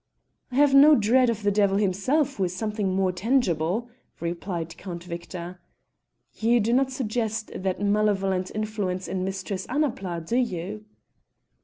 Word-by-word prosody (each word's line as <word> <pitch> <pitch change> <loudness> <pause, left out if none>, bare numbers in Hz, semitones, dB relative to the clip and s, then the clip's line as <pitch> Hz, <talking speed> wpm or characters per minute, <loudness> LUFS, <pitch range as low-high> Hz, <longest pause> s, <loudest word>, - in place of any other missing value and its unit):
"I - - -6
have 285 0 +5
no 290 +2 +8
dread 240 +3 +4
of 220 -2 -2
the 205 - +3
devil 200 -1 +2
himself, 255 +9 +1
who 195 - +1
is 180 0 -4
something 210 -1 -2
more 190 -1 +2
tangible," 190 - 0 0.3
replied 170 -1 -4
Count 175 -2 -7
Victor. 175 +1 -7 0.7
"You 235 +2 +2
do 225 +2 +1
not 265 +1 +2
suggest 220 -3 -2
that 185 0 -2
malevolent 200 -2 +1
influence 210 -4 -2
in 185 -1 -2
Mistress 190 0 -4
Annapla, 195 - -1
do 235 - 0
you?" 210 -3 -2
205 Hz, 145 wpm, -25 LUFS, 185-230 Hz, 0.7 s, no